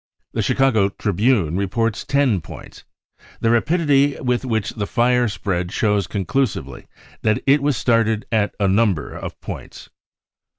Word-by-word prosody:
The -, -, -1 dB
Chicago 110 Hz, -7 st, +2 dB
Tribune 100 Hz, -3 st, 0 dB
reports 105 Hz, +3 st, -1 dB
10 135 Hz, -9 st, +1 dB
points. -, -, -12 dB, 0.6 s
The 115 Hz, -, +2 dB
rapidity 145 Hz, +2 st, +2 dB
y -, -, -11 dB
with 125 Hz, -2 st, 0 dB
which 110 Hz, -5 st, -1 dB
the 105 Hz, -3 st, -4 dB
fire 125 Hz, +1 st, +2 dB
spread 90 Hz, -4 st, -3 dB
shows 105 Hz, -4 st, +1 dB
conclusively 95 Hz, -, -2 dB, 0.3 s
that 110 Hz, -1 st, +1 dB
it 140 Hz, +1 st, +4 dB
was! 140 Hz, -3 st, +1 dB
started 115 Hz, -2 st, +1 dB
at 110 Hz, -2 st, 0 dB
a 100 Hz, -, +2 dB
number 95 Hz, -5 st, +1 dB
of -, -, -7 dB
points. -, -, -9 dB
110 Hz, 140 wpm, -20 LUFS, 100-125 Hz, 0.6 s, it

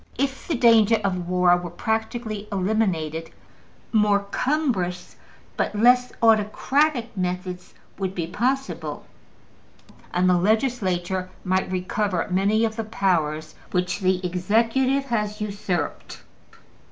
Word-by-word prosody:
If 270 Hz, +1 st, -2 dB
the 335 Hz, -, 0 dB
danger 230 Hz, -2 st, +5 dB
of 180 Hz, -3 st, -2 dB
war 180 Hz, -1 st, +4 dB
were 175 Hz, 0 st, -6 dB
practically 220 Hz, +2 st, -3 dB
eliminated, 185 Hz, -6 st, -1 dB, 0.6 s
more 210 Hz, -2 st, +3 dB
cumbrous 225 Hz, -, -1 dB, 0.4 s
but -, -, -1 dB
less 250 Hz, +3 st, +4 dB
autocratic 235 Hz, +4 st, +2 dB
methods 180 Hz, -1 st, -4 dB, 0.2 s
would 190 Hz, -1 st, -2 dB
be 170 Hz, -, -2 dB
possible, 260 Hz, +10 st, -2 dB, 1.1 s
and 180 Hz, +1 st, +2 dB
the 180 Hz, -1 st, +4 dB
Legislature 190 Hz, -4 st, 0 dB
might 185 Hz, 0 st, 0 dB
recover 185 Hz, 0 st, -1 dB
many 205 Hz, +4 st, +2 dB
of 220 Hz, 0 st, -3 dB
the 225 Hz, -, -1 dB
powers 160 Hz, -7 st, 0 dB, 0.2 s
which 180 Hz, +1 st, -1 dB
the 185 Hz, -1 st, +1 dB
executive 230 Hz, +9 st, +1 dB
has 210 Hz, -2 st, -1 dB
usurped. 200 Hz, -6 st, -4 dB
200 Hz, 110 wpm, -24 LUFS, 180-225 Hz, 1.1 s, danger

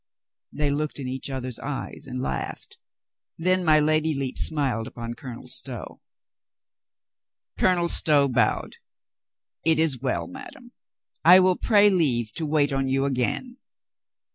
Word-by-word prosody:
They 145 Hz, -1 st, -1 dB
looked 150 Hz, +1 st, -2 dB
in 135 Hz, -3 st, -5 dB
each 130 Hz, +2 st, -5 dB
other's 130 Hz, -3 st, -5 dB
eyes 135 Hz, -1 st, -6 dB
and 130 Hz, -1 st, -5 dB
laughed. 130 Hz, -, -5 dB, 0.6 s
Then 185 Hz, +2 st, +1 dB
my 155 Hz, -2 st, +4 dB
Lady 155 Hz, +1 st, +1 dB
Lepe 135 Hz, -2 st, -3 dB
smiled 135 Hz, -7 st, +1 dB
upon 115 Hz, 0 st, -7 dB
Colonel 125 Hz, -2 st, -10 dB
Stow. -, -, -4 dB, 1.6 s
Colonel 175 Hz, -2 st, +2 dB
Stow 145 Hz, -4 st, +5 dB
bowed. 125 Hz, -, 0 dB, 0.9 s
"It 160 Hz, -1 st, +3 dB
is 155 Hz, -5 st, +1 dB
well, 130 Hz, 0 st, -2 dB
madame. 265 Hz, -1 st, -11 dB, 0.5 s
I 180 Hz, +3 st, +8 dB
will 185 Hz, 0 st, +3 dB
pray 205 Hz, -1 st, +4 dB
leave 125 Hz, -, +1 dB
to 160 Hz, -2 st, -4 dB
wait 145 Hz, -2 st, +1 dB
on 135 Hz, 0 st, -1 dB
you 135 Hz, +1 st, +1 dB
again." 140 Hz, -, -1 dB
145 Hz, 135 wpm, -24 LUFS, 130-170 Hz, 1.6 s, I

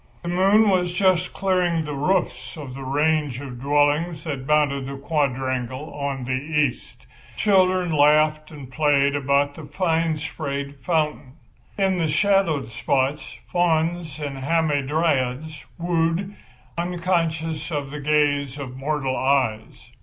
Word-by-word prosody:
The 175 Hz, -, -4 dB
moon 195 Hz, +5 st, +4 dB
was 180 Hz, -3 st, +2 dB
just 180 Hz, -1 st, +2 dB
clearing 180 Hz, -4 st, 0 dB
the 150 Hz, -, -4 dB
roofs 140 Hz, -4 st, -1 dB
of 140 Hz, -4 st, -7 dB
the 135 Hz, -, -8 dB
range 145 Hz, -1 st, 0 dB
of 125 Hz, -3 st, -8 dB
dwellings 145 Hz, +3 st, +1 dB
that 140 Hz, -5 st, -5 dB
bounded 145 Hz, -3 st, +2 dB
the 140 Hz, 0 st, -6 dB
quadrangle 135 Hz, -2 st, -2 dB
on 140 Hz, -2 st, -3 dB
the 130 Hz, -, -3 dB
east. 140 Hz, -, -2 dB, 0.3 s
Children 185 Hz, -3 st, +3 dB
laughed 155 Hz, +1 st, +3 dB
and 140 Hz, -4 st, -11 dB
played 140 Hz, 0 st, +2 dB
about 140 Hz, 0 st, +1 dB
the 155 Hz, 0 st, -10 dB
fine 165 Hz, -3 st, 0 dB
sprayed 140 Hz, -2 st, -5 dB
fountain. 150 Hz, -6 st, -1 dB, 0.4 s
In 190 Hz, -2 st, +1 dB
the 165 Hz, -, +1 dB
shadowed 165 Hz, -, +2 dB
spots 135 Hz, +5 st, -1 dB, 0.2 s
fauns 165 Hz, -2 st, 0 dB
and 140 Hz, -2 st, -5 dB
hamadryads 145 Hz, -1 st, 0 dB
wooed, 170 Hz, +3 st, -1 dB, 0.4 s
unconscious 165 Hz, -3 st, -1 dB
of 145 Hz, -4 st, -3 dB
the 150 Hz, -, -6 dB
gaze 145 Hz, -2 st, +1 dB
of 130 Hz, -3 st, -7 dB
mortal 135 Hz, -1 st, -2 dB
eyes. 130 Hz, -5 st, -1 dB
150 Hz, 130 wpm, -23 LUFS, 140-165 Hz, 0.4 s, moon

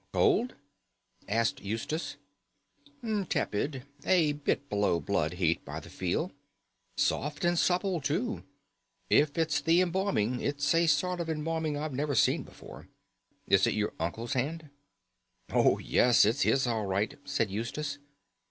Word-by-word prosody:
"Cold?" 370 Hz, -, +2 dB, 0.7 s
asked 115 Hz, +2 st, +1 dB
Eustace. 145 Hz, +9 st, -3 dB, 1.1 s
"Tepid. 130 Hz, +5 st, -1 dB, 0.2 s
A 170 Hz, -5 st, +3 dB
bit 145 Hz, -1 st, -2 dB
below 100 Hz, -6 st, +1 dB
blood 75 Hz, +1 st, -1 dB
heat 85 Hz, -2 st, 0 dB
by -, -, -6 dB
the -, -, -13 dB
feel. -, -, -2 dB, 0.7 s
Soft 150 Hz, +3 st, 0 dB
and 175 Hz, 0 st, +3 dB
supple 180 Hz, -1 st, +1 dB
too. 185 Hz, -, -1 dB, 0.7 s
If 145 Hz, 0 st, +4 dB
it's 160 Hz, -3 st, +1 dB
the 165 Hz, +4 st, +4 dB
embalming, 180 Hz, -, 0 dB
it's 145 Hz, +1 st, 0 dB
a 165 Hz, 0 st, +3 dB
sort 175 Hz, +4 st, +1 dB
of 170 Hz, -1 st, -3 dB
embalming 160 Hz, -1 st, -2 dB
I've 150 Hz, -1 st, -4 dB
never 140 Hz, +1 st, -1 dB
seen -, -, +3 dB
before. -, -, -12 dB, 0.6 s
Is -, -, +4 dB
it -, -, 0 dB
your 105 Hz, -1 st, -1 dB
uncle's 100 Hz, +9 st, -3 dB
hand?" 150 Hz, +4 st, -3 dB, 0.8 s
"Oh, -, -, +4 dB
yes, 120 Hz, -4 st, +4 dB
it's 115 Hz, +7 st, +1 dB
his 135 Hz, -1 st, +3 dB
all 110 Hz, -4 st, -1 dB
right," 100 Hz, +3 st, -1 dB
said 125 Hz, -8 st, -1 dB
Eustace. 145 Hz, +8 st, -4 dB
145 Hz, 135 wpm, -30 LUFS, 115-165 Hz, 1.1 s, If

